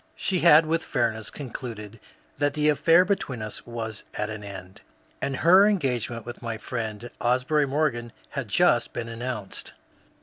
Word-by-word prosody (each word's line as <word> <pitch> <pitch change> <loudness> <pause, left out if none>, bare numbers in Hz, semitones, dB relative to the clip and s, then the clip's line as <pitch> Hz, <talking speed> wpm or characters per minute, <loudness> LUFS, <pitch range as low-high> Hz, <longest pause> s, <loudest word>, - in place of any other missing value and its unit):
She 185 -2 0
had 160 -1 +7
with 160 +1 0
fairness 110 -4 -1
concluded 115 -5 -7 0.4
that 145 0 +1
the 150 0 +3
affair 165 +4 +5
between 135 - -2
us 105 +2 -7
was 115 -2 -5
at 105 +1 -2
an 110 -1 -7
end, 95 -2 -9 0.4
and 135 - -1
her 185 +8 +6
engagement 125 - -1
with 120 0 -8
my 115 -2 -4
friend 110 0 -5
Asbury 130 +5 +2
Morgan 130 -5 -1 0.2
had - - -4
just - - +3
been 120 -1 -4
announced. 115 -3 -6
120 Hz, 155 wpm, -26 LUFS, 110-150 Hz, 0.4 s, had